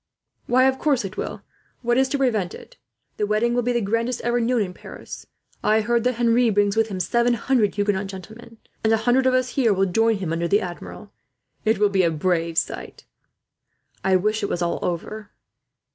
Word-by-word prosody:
"Why, 255 +1 +4
of 265 0 +2
course 275 -8 +1
it 195 +2 -7
will. - - -5 0.4
What 240 0 +2
is 265 +1 +2
to 285 - 0
prevent 220 -9 0
it? - - -14 0.4
The 210 - 0
wedding 215 +3 +1
will 245 - +1
be 245 +1 0
the 240 -1 0
grandest 230 +4 -1
ever 240 +1 0
known 235 -1 +1
in 180 -2 -6
Paris. - - -10 0.4
I 215 +1 +3
hear 235 +2 +1
that 250 +1 0
Henri 235 0 +3
brings 205 -1 +2
with 225 0 +2
him 195 -4 -5
seven 235 +6 +2
hundred 230 -3 +1
Huguenot 205 -1 0
gentlemen; 220 +5 -11 0.3
and 220 - +2
a 225 - +4
hundred 260 +2 +3
of 255 - +3
us 255 0 +1
here 240 -6 +2
will 195 +1 +2
join 225 +4 +2
him, 185 -5 -3
under 170 +1 -1
the 200 +3 +3
Admiral. 175 -3 -8 0.5
It 220 +1 +3
will 210 0 +3
be 195 -1 +2
a 170 - +3
brave 165 0 -1
sight." - - -3 1.0
"I 190 -1 +3
wish 215 +4 +1
it 200 - -2
was 175 - -1
all 170 - -1
over." 205 +5 -4
220 Hz, 205 wpm, -23 LUFS, 195-240 Hz, 1.0 s, Why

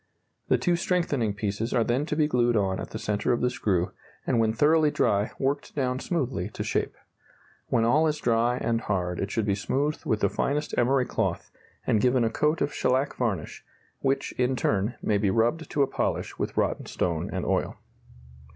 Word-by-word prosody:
The - - +3
two 175 -2 +1
strengthening 145 - 0
piece's 105 +4 -2
are 120 - +4
then 125 +6 0
to 150 - -1
be 155 -1 +3
glued 120 -4 +2
on 95 -2 0
at - - -6
the - - -5
centre 105 +1 0
of 120 - -1
the 125 - +2
screw, 95 -7 0 0.3
and 120 - +1
when 110 -1 +3
thoroughly 150 +6 +4
dry, 105 -6 +1
worked 140 +2 -2
down 130 -2 0
smoothly 130 - -2
to - - -3
shape. - - -1 0.7
When 115 - +2
all 155 +7 +4
is 150 -1 0
dry 120 -1 +1
and 115 -1 0
hard 90 -4 -2
it 100 - -2
should 110 -1 -1
be 100 - +2
smoothed 140 +9 -1
with 110 -1 0
the 100 - +4
finest 150 +2 -1
emery 130 +1 +2
cloth - - -2 0.3
and 105 - +2
given 125 -1 +3
a 115 - +1
coat 150 +7 +1
of 145 - 0
shellac 130 +2 +1
varnish, 105 -10 -2 0.4
which, 135 0 0
in 125 +1 +2
turn, 110 0 0
may 105 -1 +2
be 100 -1 +2
rubbed 120 +11 +1
to 145 - +2
a - - +1
polish - - -2
with - - -3
rotten - - 0
stone 85 -3 -1
and - - -3
oil. - - 0
120 Hz, 195 wpm, -27 LUFS, 105-140 Hz, 0.7 s, are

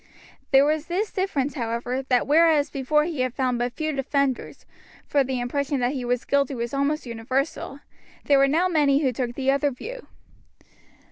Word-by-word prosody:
There 270 0 +6
was 305 +1 0
this 390 +5 -1
difference, 300 -8 -1
however, 240 0 -2
that 255 -2 +1
whereas 310 -1 +4
before 285 +3 +1
he 315 -3 -4
had 255 -1 -1
found 255 -3 0
but 245 0 -2
few 310 -1 -2
defenders, 275 -1 -2 0.4
for 285 -1 +2
the 260 -1 -3
impression 280 +3 -1
that 245 +1 +1
he 265 -3 -4
was 245 0 -1
guilty 280 -1 +1
was 235 +1 -4
almost 280 +2 0
universal, 260 +5 -3 0.4
there 280 -1 +4
were 275 - +5
now 325 +6 +2
many 295 -4 +2
who 260 -2 +1
took 240 0 -3
the 270 0 +1
other 280 +1 +1
view. 475 - -8
275 Hz, 180 wpm, -24 LUFS, 255-300 Hz, 0.4 s, There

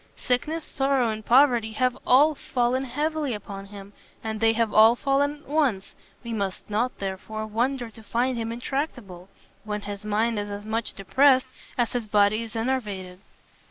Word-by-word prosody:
Sickness, 300 +6 -1
sorrow, 270 -3 +1
and 215 0 -6
poverty 240 -3 +4
have 255 +2 +1
all 290 +5 +6
fallen 255 -1 -1
heavily 295 0 -1
upon 195 -1 -8
him, 200 0 -11 0.3
and 220 -1 -3
they 225 0 +4
have 225 -1 0
all 220 +2 +7
fallen 285 +3 0
at - - -22
once: 270 -10 0 0.3
we 235 -1 -5
must 200 -3 -3
not, 225 +4 -1
therefore, 200 +3 -5
wonder 240 +2 -1
to 225 - -14
find 240 +4 0
him 230 -1 -3
intractable, 235 - -4 0.3
when 210 -1 -4
his 205 0 -7
mind 215 +1 0
is 205 0 -4
as 205 0 -6
much 220 +1 -2
depressed, 260 +7 +4 0.3
as 240 -2 0
his 240 -3 -2
body 205 +1 +3
is 230 -1 -8
enervated." 210 -7 -3
230 Hz, 165 wpm, -25 LUFS, 210-260 Hz, 0.3 s, all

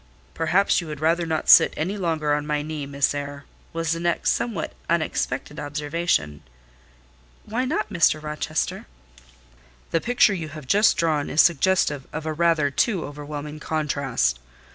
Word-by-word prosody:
"Perhaps 175 +5 +2
you 170 - -8
would 150 -2 -6
rather 165 +2 +1
not 160 -1 -2
sit - - +7
any 180 +6 -2
longer 160 -6 0
on 150 0 -1
my 150 -1 -1
knee, 150 -2 -5
Miss 140 0 +1
Eyre?" 145 0 -6 0.3
was 165 -1 -2
the 165 - -1
next 170 0 +1
somewhat 215 -10 -2 0.2
unexpected 160 -2 -1
observation. 145 - -1 1.0
"Why 240 +4 -2
not, 270 -5 -2
Mr. 165 -4 +3
Rochester?" 150 +1 -3 1.0
"The 165 - +1
picture 245 -3 +3
you 165 -5 -4
have 155 -2 -9
just 205 +9 +4
drawn 155 -3 0
is 150 - -1
suggestive 165 -4 +2
of 160 0 -5
a 155 - -2
rather 160 -3 +2
too 185 - 0
overwhelming 150 +1 -7
contrast. 140 - -1
155 Hz, 150 wpm, -24 LUFS, 145-170 Hz, 1.0 s, sit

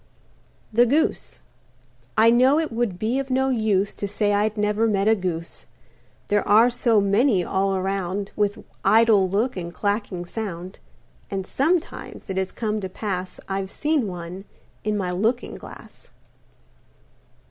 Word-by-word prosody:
THE 240 +2 +5
GOOSE 300 +6 0 0.8
I 225 +1 +6
know 255 +5 +5
it 320 -4 -1
would 225 -5 -1
be 225 +7 0
of 275 0 -4
no 265 +1 +1
use 215 -5 +1
To 200 - -4
say 205 +1 0
I'd 210 +1 +1
never 210 +2 +1
met 200 -1 +1
a 220 - +6
Goose. 175 -5 -4 0.6
There 205 0 +2
are 225 +4 +6
so 235 -2 +3
many 200 0 +3
all 195 +1 0
around, 195 +1 -2
With 205 -1 -1 0.2
idle 220 -4 +5
look 220 +7 0
and 170 -2 -5
clacking 200 -2 -2
sound. 185 -2 -6 0.5
And 195 -1 -3
sometimes 320 - -2
it 190 - -4
has 190 0 -1
come 215 -2 -2
to 190 - -4
pass 185 -2 -4
I've 195 0 -3
seen 295 -1 0
one 180 +1 -7 0.4
in 210 0 0
my 185 -3 -2
looking 225 +7 -1
glass. - - -12
205 Hz, 145 wpm, -23 LUFS, 190-230 Hz, 0.8 s, I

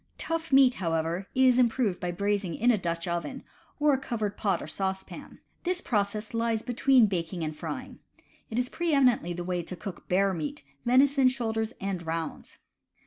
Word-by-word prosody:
Tough 330 -1 -3
meat, 265 -2 +6
however, 165 +2 -1
is 255 -1 +5
improved 235 -5 +2
by 180 - -3
braising 200 -1 -1
in 245 +2 +3
a 225 - +2
Dutch 170 -1 -3
oven, 175 +11 -3 0.4
or 295 -1 +4
a 265 - +1
covered 220 -6 -3
pot 195 -5 0
or - - -6
saucepan. 190 +4 -5 0.3
This 360 0 0
process 210 - -1
lies 230 -1 0
between 250 0 +4
baking 175 -3 -2
and 155 -1 -3
frying. - - -6 0.5
It 220 - -4
is 250 0 +1
pre 330 +2 0
eminently 245 -10 +3
the 175 +1 -5
way 180 0 -1
to 175 +2 -7
cook 180 0 -8
bear 195 +1 +3
meat, 285 - -5 0.2
venison 270 +2 +5
shoulders 225 -3 -1
and 190 -3 -3
rounds. 165 0 -5
215 Hz, 175 wpm, -28 LUFS, 180-255 Hz, 0.5 s, meat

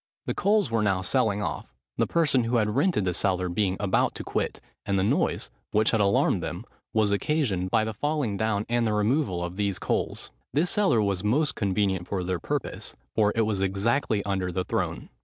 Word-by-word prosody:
The - - -1
coals 205 - +2
were 115 -1 +2
now 95 -3 +1
selling 105 0 +1
off, 65 - -5 0.2
the - - +2
person 145 -7 +2
who 120 +2 0
had 105 -2 +1
rented 175 - +2
the 90 - 0
cellar 90 0 0
being 95 +1 0
about 100 -2 +1
to - - -6
quit; - - -2 0.2
and 100 - 0
the 95 - +2
noise, 100 - 0 0.2
which 110 +1 +3
had 110 - +2
alarmed 100 0 +2
them, - - -5 0.3
was 110 -2 +2
occasioned 100 - 0
by 110 +2 +3
the 110 0 -3
falling 145 -3 -1
down 105 0 0
and 120 -1 +1
the 105 - 0
removal 105 - +1
of 90 +2 -5
these 100 -2 0
coals. - - -2 0.2
This 165 +5 +2
cellar 190 - +3
was 100 -2 -1
most 140 +8 +2
convenient 95 -3 0
for 95 -3 -2
their 90 0 -2
purpose: - - -4 0.2
for 105 -2 +3
it 115 - +2
was 105 -3 0
exactly 100 +3 +1
under 95 -2 -1
the 90 +1 -1
throne. - - -3
105 Hz, 200 wpm, -26 LUFS, 95-115 Hz, 0.3 s, which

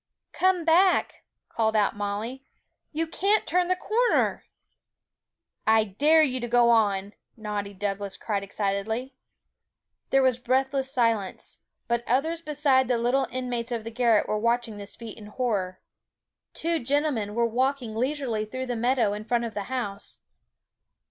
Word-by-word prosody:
'Come 370 -2 +2
back,' 360 +3 +3 0.2
called 220 -1 0
out 210 -2 +2
Molly; 210 +6 -4 0.5
'you 325 +1 -1
can't 400 +6 +1
turn 360 +1 +1
the 370 - +2
corner!' 465 +6 +1 1.2
'I 220 0 +5 0.2
dare 315 +2 +6
you 255 -3 0
to 240 - -4
go 240 0 +4
on!' 205 -3 +2 0.2
naughty 210 -2 -4
Douglas 200 0 -3
cried 205 -3 -2
excitedly. 205 +6 -2 1.0
There 270 0 +4
was 255 -2 +2
breathless 265 +2 0
silence; 230 -7 -1 0.3
but 235 0 0
others 320 +7 0
besides 285 -5 +2
the 245 - +2
little 250 +3 +1
inmates 245 -2 -3
of 230 -2 -2
the 230 - -6
garret 230 -2 +2
were 215 - -1
watching 235 -1 0
this 205 0 -8
feat 230 -1 -9
in 210 - -11
horror. 210 -6 -2 0.8
Two 335 0 0
gentlemen 265 -5 -1
were 235 0 +2
walking 250 0 -1
leisurely 255 -3 -1
through 255 +4 -5
the 245 -1 -3
meadow 240 -2 +1
in 210 +1 -5
front 235 +1 0
of 225 - -6
the 205 -2 -4
house. 210 -6 -4
240 Hz, 150 wpm, -26 LUFS, 215-270 Hz, 1.2 s, dare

